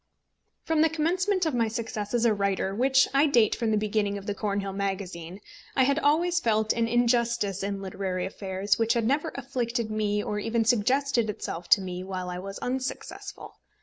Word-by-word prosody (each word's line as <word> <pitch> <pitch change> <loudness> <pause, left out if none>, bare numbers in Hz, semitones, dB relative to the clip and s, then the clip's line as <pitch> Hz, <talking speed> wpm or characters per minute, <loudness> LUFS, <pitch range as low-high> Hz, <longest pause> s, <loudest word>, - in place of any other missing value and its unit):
From 320 -1 +1
the 320 - +5
commencement 360 +4 +1
of 315 - 0
my 235 -2 +2
success 220 -1 -4
as 240 0 +2
a 225 - +4
writer, 200 -1 0
which 265 +4 +4
I 280 +3 +4
date 235 -7 +4
from 230 -2 -1
the 215 - +2
beginning 210 -1 0
of 200 - -9
the 205 - -2
Cornhill 200 -2 -2
Magazine, 190 -3 -4 0.4
I 265 - +4
had 280 +3 +2
always 330 +3 +2
felt 220 -4 +1
an 230 -1 0
injustice 235 -4 +1
in 200 0 -3
literary 185 -1 -3
affairs 195 +1 -1
which 230 0 +3
had 230 -2 +1
never 295 +6 +1
afflicted 245 -4 -2
me 210 -1 0
or 210 - -2
even 225 +1 0
suggested 240 +1 +2
itself 175 -4 -5
to 200 - +6
me 180 -1 -5
while 185 -1 -4
I 180 - -5
was 195 +1 -7
unsuccessful. 260 +1 -5
220 Hz, 185 wpm, -27 LUFS, 200-255 Hz, 0.4 s, to